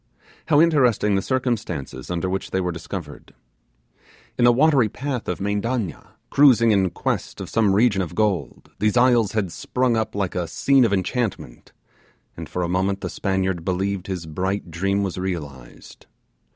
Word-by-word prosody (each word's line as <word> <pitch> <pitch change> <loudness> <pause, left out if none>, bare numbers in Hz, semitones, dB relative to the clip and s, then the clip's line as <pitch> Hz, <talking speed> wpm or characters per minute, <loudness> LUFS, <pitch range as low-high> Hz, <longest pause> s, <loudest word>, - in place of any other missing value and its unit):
How 145 -2 +4
interesting 130 -10 +3
the 95 - +2
circumstances 115 - -3
under 90 0 -2
which 95 +1 -3
they 95 - -1
were 90 -1 -1
discovered! 80 -2 -8 1.0
In 120 - +2
the 120 - +7
watery 135 -3 +3
path 130 +1 -4
of 90 - -3
Mendanna, 105 0 -3 0.2
cruising 125 -5 +5
in 95 -3 +3
quest - - -3
of - - -7
some 105 -4 +2
region 105 -2 +3
of 85 -1 -5
gold, 105 -4 -1
these 105 +2 +1
isles 120 -4 +4
had 100 -5 -1
sprung 125 +8 0
up 110 -2 -2
like 100 -3 -1
a 90 -2 -2
scene 135 +5 +3
of 110 - 0
enchantment, 100 - -3 0.6
and - - -8
for 90 - -2
a - - -1
moment 95 +2 -1
the - - -4
Spaniard 95 -3 -1
believed 95 +1 -2
his 90 -4 -4
bright 95 +3 -3
dream 100 +4 0
was 95 -2 -3
realized. 75 -9 -7
100 Hz, 165 wpm, -22 LUFS, 90-120 Hz, 1.0 s, the